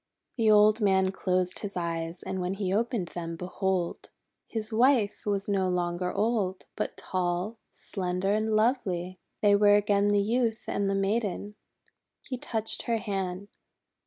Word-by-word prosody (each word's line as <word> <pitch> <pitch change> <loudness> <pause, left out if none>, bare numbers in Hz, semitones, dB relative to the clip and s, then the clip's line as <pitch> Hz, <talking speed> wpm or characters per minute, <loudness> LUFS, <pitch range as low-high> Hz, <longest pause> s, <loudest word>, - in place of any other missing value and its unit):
The 225 -3 +2
old 210 +1 +6
man 190 -2 +3
closed 185 -1 -1
his 200 -3 -5
eyes, 165 0 -3
and 190 -1 -3
when 180 +2 -2
he 195 -2 -1
opened 225 -4 0
them, 165 -1 -5
behold! 185 0 -2 0.4
his 220 -1 -4
wife 235 -3 +3
was 200 -1 0
no 195 -2 +1
longer 180 0 -1
old, 200 -3 0
but - - -3
tall, 185 +4 -2
slender, 185 0 -2
and 215 0 +1
lovely! 185 -6 0 0.2
They 205 -1 +6
were 205 0 +6
again 205 0 +3
the 205 -1 +3
Youth 230 +1 0
and 200 -1 0
the 195 - +1
Maiden! 200 0 -1 0.7
He 260 - -4
touched 220 -2 -1
her 230 -1 +2
hand. 195 -2 -3
200 Hz, 150 wpm, -28 LUFS, 185-215 Hz, 0.7 s, old